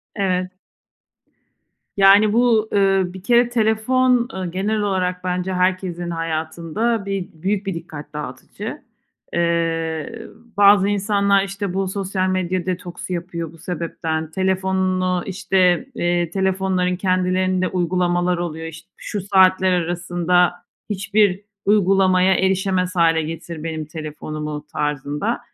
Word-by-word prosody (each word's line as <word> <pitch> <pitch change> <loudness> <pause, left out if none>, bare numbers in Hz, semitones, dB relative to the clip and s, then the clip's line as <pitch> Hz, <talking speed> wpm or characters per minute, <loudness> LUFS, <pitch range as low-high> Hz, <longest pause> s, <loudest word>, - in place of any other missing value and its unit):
Evet. 185 -2 0 1.5
Yani 200 +2 +6
bu, 230 -2 +3
eee, 195 -1 +3
bir 180 +1 -9
kere 240 +1 +4
telefon, 240 +2 +2
eee, 190 -1 -3
genel 205 +4 -1
olarak 185 -2 -1
bence 180 +1 -2
herkesin 180 -1 -1
hayatında 165 +7 -2
bir 195 -2 -3
büyük 190 +5 -2
bir 195 - -2
dikkat 160 -3 -9
dağıtıcı. 130 -4 -7 0.5
Eee, 165 +4 -1 0.3
bazı 200 -1 +6
insanlar 200 -1 +2
işte 195 -1 -4
bu 195 0 -1
sosyal 190 -1 -2
medya 185 -1 -1
detoksu 180 0 -4
yapıyor 170 -2 -4
bu 165 - -15
sebepten. 160 -2 -4
Telefonunu 185 -1 0
işte, 190 +2 +1
eee, 175 -3 0
telefonların 190 -1 0
kendilerinde 185 0 +1
uygulamalar 175 0 0
oluyor. 165 -2 -4
İşte 165 +3 -11
"Şu 205 - -5
saatler 190 -1 +4
arasında 175 0 +1 0.4
hiçbir 200 -1 +1 0.2
uygulamaya 190 -2 +4
erişemez 190 -1 0
hâle 165 -1 +3
getir 165 0 -6
benim 160 -1 -4
telefonumu." 150 -1 -6
tarzında. 150 0 -2
185 Hz, 115 wpm, -21 LUFS, 170-195 Hz, 1.5 s, Yani